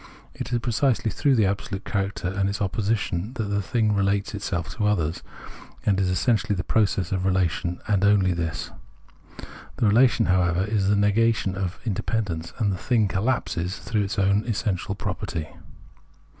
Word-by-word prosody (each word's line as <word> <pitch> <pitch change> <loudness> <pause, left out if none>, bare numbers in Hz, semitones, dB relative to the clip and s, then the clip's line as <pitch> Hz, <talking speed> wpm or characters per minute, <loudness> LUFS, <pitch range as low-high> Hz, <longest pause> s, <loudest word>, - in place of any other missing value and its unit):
It - - -6
is 120 - +2
precisely 120 0 +1
through 140 +7 +2
the 110 -4 +4
absolute 95 0 -3
character 100 -2 -2
and 95 +1 0
its 100 +1 -3
opposition 100 0 -1
that 120 -4 -2
the 100 0 +1
thing 110 +1 +1
relates 100 +1 0
itself 90 -5 -3
to 105 -2 0
others, 85 -6 0 0.6
and 100 -2 +2
is 95 -1 +1
essentially 110 +3 +1
this 90 - -3
process 100 -5 +1
of 95 -1 -1
relation, 90 -2 0
and 100 -2 +2
only 100 -3 +4
this. 80 -2 -3 1.1
The - - +1
relation, 115 +2 +4
however, 90 -1 +2
is 105 -2 0
the 105 - +3
negation 105 0 +2
of 95 -2 -3
its - - -24
independence, 100 -6 -2
and 105 -3 +1
the 95 - -2
thing 110 0 +2
collapses 95 -4 -1
through 110 -1 -1
its 100 +2 -3
own 100 +1 +3
essential 100 -3 -1
property. 90 -5 -4
100 Hz, 165 wpm, -25 LUFS, 95-110 Hz, 1.1 s, the